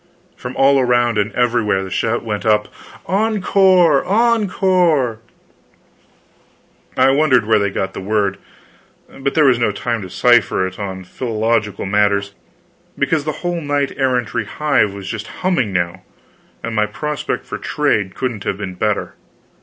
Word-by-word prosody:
From 125 +1 -8
all 135 0 +4
around 120 -3 +2
and 105 +1 0
everywhere, 115 -5 +1
the 95 - -8
shout 115 +5 -1
went 105 -3 -3
up: 105 -2 +2 0.4
"Encore! 190 -5 +3
encore!" 185 - +2 1.8
I 130 +1 +5
wondered 135 -5 +3
where 110 0 +3
they 100 0 0
got 95 0 -3
the - - -6
word, 100 -1 -1 0.8
but 135 0 -2
there 155 -2 +4
was 125 -3 +4
no 115 -3 +1
time 115 +2 -3
to 95 - -8
cipher 120 -4 +3
on 95 -2 -5
philological 110 0 -2
matters, 100 0 +1 0.6
because 145 +1 0
the 155 - 0
whole 175 -1 -1
knight 145 -2 -1
errantry 125 -4 -1
hive 125 -2 +1
was 100 -1 -9
just 110 +1 -5 0.2
humming 130 - +1
now, 85 -2 -2 0.6
and 115 -1 -4
my 105 0 +2
prospect 145 +8 -4
for - - -6
trade 100 -3 -1
couldn't 120 -6 -3
have 100 - -2
been 100 -2 -5
better. 105 +3 -2
115 Hz, 145 wpm, -18 LUFS, 105-145 Hz, 1.8 s, I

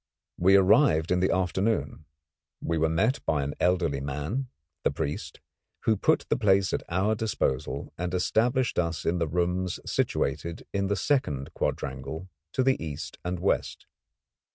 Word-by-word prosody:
We 95 +3 +6
arrived 95 - +5
in 90 - +3
the 95 - +2
afternoon. 95 -4 0 0.5
We 85 -1 -1
were 80 0 +2
met 110 - +1
by 75 -3 +1
an 70 +1 -3
elderly 85 -6 +2
man, 75 - -3 0.3
the - - +2
priest, 70 +1 -4 0.4
who 110 - +3
put - - +2
the - - +1
place 95 -2 +3
at - - 0
our 95 +5 +2
disposal 105 - -2
and 90 0 -2
established 120 +7 +1
us 85 -1 -1
in 85 +1 +1
the 85 - 0
rooms 90 +2 -1
situated 80 +4 -1
in 100 -1 0
the 100 - +1
second 90 - 0
quadrangle 70 +7 -3 0.2
to 130 - +2
the 130 -8 +2
east 75 -1 -6
and 90 +1 -2
west. 95 - -1
90 Hz, 155 wpm, -27 LUFS, 80-100 Hz, 0.5 s, We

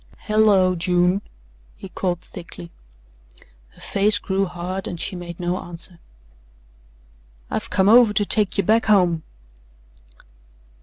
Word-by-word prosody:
"Hello, 210 -4 +3
June!" 180 +2 +1 0.6
he - - -9
called 180 -2 -3
thickly. 90 - -11 1.0
Her - - -18
face 205 +1 +2
grew 195 0 -1
hard 180 +1 -5
and 175 - -6
she 190 - -3
made 175 -1 -8
no 180 +1 -2
answer. 170 0 -9 1.5
"I've - - -3
come 190 +1 +2
over 230 0 +7
to 205 0 +1
take 210 0 +1
ye 200 - +2
back 220 +5 +2
home." 180 -6 +3
185 Hz, 120 wpm, -21 LUFS, 175-205 Hz, 1.5 s, over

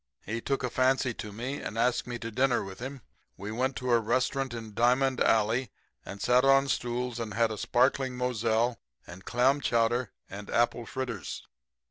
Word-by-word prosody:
He 115 +3 -3
took 135 +1 -1
a 125 - -1
fancy 130 -1 +2
to 105 -1 -7
me 125 +7 -4
and 110 - -5
asked 120 +2 +1
me 120 -1 -4
to 115 0 -6
dinner 130 +1 +2
with 95 -1 -9
him. 130 +2 -6 0.4
We 100 +2 -6
went 130 +4 -1
to 125 -1 -2
a 120 - +5
restaurant 130 +3 0
in 110 -2 -7
Diamond 125 +3 +2
alley 115 +3 +2 0.3
and 100 - -8
sat 125 +4 +3
on 135 0 +5
stools 120 -1 -2
and 110 -2 -4
had 115 -1 +2
a 110 - -4
sparkling 130 0 +1
Moselle 120 -1 0 0.3
and 90 +2 -12
clam 130 +4 +2
chowder 120 -1 +1 0.2
and 100 +1 -9
apple 120 0 +1
fritters. 120 - -5
120 Hz, 180 wpm, -29 LUFS, 115-130 Hz, 0.4 s, a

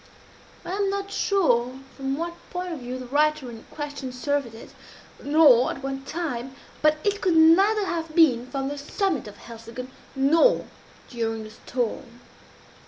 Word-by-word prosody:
I - - -5
am 395 +1 0
not 395 0 -3
sure 255 - +1 0.2
from 270 0 -3
what 340 +1 -3 0.2
point 360 0 -4
of 315 - -6
view 250 +1 -5
the 255 - -7
writer 295 0 +1
in 225 -1 -11
question 285 -3 -6
surveyed 250 -2 -2
it, 225 - -12 0.5
nor 285 -5 +6
at 270 - -6
what 270 0 -5
time; 270 -6 -4 0.3
but 305 0 +4
it 410 0 0
could 365 -3 +2
neither 390 +7 +5
have 325 -3 -4
been 255 -8 +4
from 270 0 -3
the 290 0 -5
summit 305 - -1
of 205 -1 -11
Helseggen, 230 +2 -9 0.2
nor 295 - +4 0.4
during 225 -2 -3
a 215 - -11
storm. 240 +1 -4
280 Hz, 160 wpm, -25 LUFS, 245-330 Hz, 0.5 s, nor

